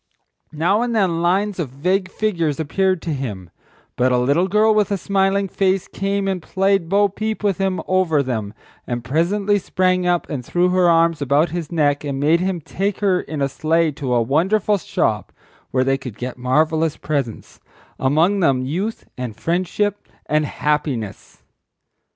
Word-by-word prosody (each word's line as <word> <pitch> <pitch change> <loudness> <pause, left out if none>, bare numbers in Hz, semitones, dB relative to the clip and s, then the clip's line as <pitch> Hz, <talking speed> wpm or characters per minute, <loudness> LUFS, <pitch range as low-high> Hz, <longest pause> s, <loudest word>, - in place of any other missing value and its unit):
—Now 175 +8 +1
and 240 -1 -1
then 180 -6 +1
lines 190 +3 +1
of 155 -6 -2
vague 185 +8 -1
figures 170 -9 -1
appeared 185 +3 0
to 170 - -3
him, 105 - -5 0.4
but 125 +1 +2
a 125 - +3
little 140 +9 +2
girl 215 +3 +3
with 210 -2 +2
a 200 - 0
smiling 195 +1 +1
face 190 0 0
came 195 0 -2
and 190 -2 -1
played 195 0 0
bo 205 +2 +4
peep 215 +2 -4
with 200 -3 +1
him 190 -1 0
over 180 -6 +2
them, 110 -5 -4 0.3
and 120 -1 -3
presently 195 - +1
sprang 185 -1 +1
up 175 -1 +1
and 140 -5 -4
threw 175 +8 +1
her 180 -1 +3
arms 165 -2 +3
about 145 +4 +2
his 170 -2 -4
neck 145 -3 +1
and 140 -2 -3
made 155 +4 +3
him 185 -1 -1
take 195 +6 -3
her 190 -3 +2
in 150 -3 -4
a - - +2
sleigh 160 +4 +1
to 135 -4 -2
a 120 - +3
wonderful 190 - +1
shop - - -1 0.4
where 130 0 +1
they 135 +1 +1
could 125 -6 -8
get 125 +1 -5
marvellous 155 +5 +1
presents; 140 -7 -4 0.4
among 160 +9 +2
them 135 -7 +2
Youth, 190 +11 -3
and 120 -4 -4
Friendship, 185 - -1 0.2
and 150 0 +1
Happiness. 150 -8 -3
170 Hz, 170 wpm, -20 LUFS, 140-195 Hz, 0.4 s, bo